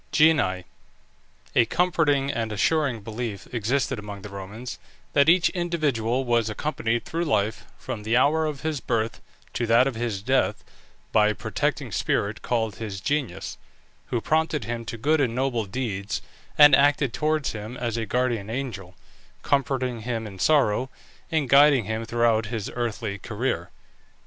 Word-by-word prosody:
GENII. 150 - +3 0.9
A 120 - +5
comforting 145 -2 +2
and 115 -3 -2
assuring 130 +2 +1
belief 110 -1 -5
existed 125 +2 0
among 100 -1 -8
the 105 - -8
Romans, 105 +6 -7 0.3
that 140 +1 +5
each 175 +1 +5
individual 140 -9 0
was 120 -2 +2
accompanied 115 -1 -2
through 165 +1 -2
life, 110 -8 0
from 105 - -6
the 110 +3 +1
hour 155 +4 +3
of 150 -3 -5
his 155 -2 -2
birth 115 -2 -2 0.3
to 120 - -1
that 115 +3 +5
of 135 - -1
his 115 -4 -3
death, 130 +3 +1 0.5
by 105 -1 +5
a 105 - 0
protecting - - -2
spirit, - - -1
called 110 -3 -1
his 105 -4 -5
genius, 120 -7 -2 0.5
who 120 - -1
prompted 155 +1 0
him 115 +1 -4
to 115 0 -5
good 150 +6 +2
and 120 -4 0
noble 125 -4 0
deeds, 100 -1 -3 0.3
and 145 -2 +9
acted 140 -3 +3
towards 155 -2 0
him 110 +3 -7
as 120 -3 -2
a 115 -2 -2
guardian 120 -2 0
angel, 110 -8 -5 0.5
comforting 130 -3 0
him 115 -1 -3
in 95 -3 -9
sorrow, 130 - +3 0.4
and 155 -4 +1
guiding 140 -2 +6
him 110 +2 -3
throughout 115 -2 +2
his 110 -3 -4
earthly 110 -4 -3
career. 105 -7 -3
120 Hz, 155 wpm, -25 LUFS, 110-140 Hz, 0.9 s, and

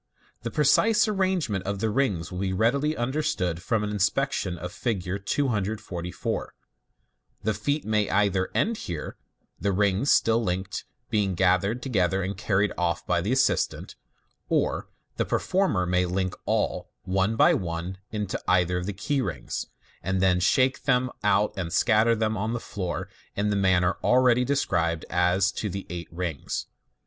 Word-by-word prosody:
The 120 - -3
precise 155 - +4
arrangement 185 - 0
of 100 0 -1
the 110 +2 0
rings 105 -10 0
will 90 - -5
be 95 -1 -1
readily 140 +10 +1
understood 120 - -1
from 110 +2 0
an 105 - -2
inspection 105 -2 0
of 90 +1 -6
Fig 110 -1 -2
244.* 100 -2 -2 1.0
The 110 +1 +1
feat 145 +9 -1
may 105 -1 +1
either 95 -2 +2
end 225 +1 +1
here, 85 - -5 0.4
the 100 - 0
rings, 100 +6 +2
still 115 +1 +4
linked, 95 -1 -3 0.3
being 100 -4 +1
gathered 95 +6 +2
together 95 -6 +1
and 95 +2 -3
carried 100 +1 +1
off 85 -1 0
by 90 -1 +1
the 100 +7 -1
assistant, 130 - +1 0.5
or - - 0 0.3
the - - +1
performer 180 - +1
may 90 0 +1
link 95 0 -1
all - - 0
one 95 +4 +1
by - - +5
one 85 +1 -3
into 105 -3 -3
either 90 -1 +3
of 90 - -5
the 105 - -2
key 110 +8 -1
rings, - - -4 0.3
and 95 0 -1
then 90 -1 +3
shake 130 +8 +2
them 130 -2 +2
out 105 +1 +3
and 90 -4 -4
scatter 110 +4 +4
them 110 0 0
on 110 +3 -2
the 120 - -2
floor 90 -6 -4 0.3
in 105 +1 0
the - - +1
man 95 -2 +3
ner 90 +2 +1
already 125 0 +4
described 85 - 0
as 90 +2 +3
to 105 - -3
the 95 +1 -5
eight 85 -1 -6
rings. 85 -4 -3
100 Hz, 160 wpm, -26 LUFS, 90-115 Hz, 1.0 s, by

